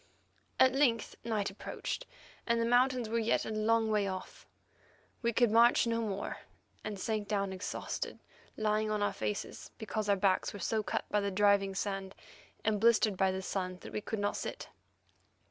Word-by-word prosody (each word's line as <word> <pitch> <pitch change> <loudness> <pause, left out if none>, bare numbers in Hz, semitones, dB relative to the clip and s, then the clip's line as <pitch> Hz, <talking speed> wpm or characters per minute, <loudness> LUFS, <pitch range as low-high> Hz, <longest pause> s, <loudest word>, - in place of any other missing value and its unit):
At 260 0 +6
length 255 -5 +2
night 210 -4 -1
approached, - - -5 0.4
and 235 0 +2
the 230 - +2
mountains 245 0 +3
were 230 +1 0
yet 225 0 +1
a - - -4
long 220 +1 +2
way 210 -2 +2
off. 185 -1 -7 0.7
We 235 -1 +1
could 235 -1 +3
march 235 +2 +6
no 230 0 0
more, 200 -3 -3 0.4
and 210 -2 -5
sank 215 0 -2
down 200 -2 -1
exhausted, 185 +1 -4 0.4
lying 215 0 +1
on 210 -1 0
our 205 - +1
faces, 205 - -4
because 215 -1 -3
our 200 - +5
backs 190 -1 +1
were 205 - -7
so 220 +4 0
cut - - -2
by 210 - +3
the 200 0 0
driving 200 0 +3
sand 195 -1 -3 0.5
and 210 -2 +1
blistered 225 -3 +4
by 190 0 +2
the 190 0 -4
sun 185 -1 -2
that - - -10
we 210 - -2
could 220 - -4
not 205 0 0
sit. - - -5
215 Hz, 180 wpm, -32 LUFS, 200-230 Hz, 0.7 s, At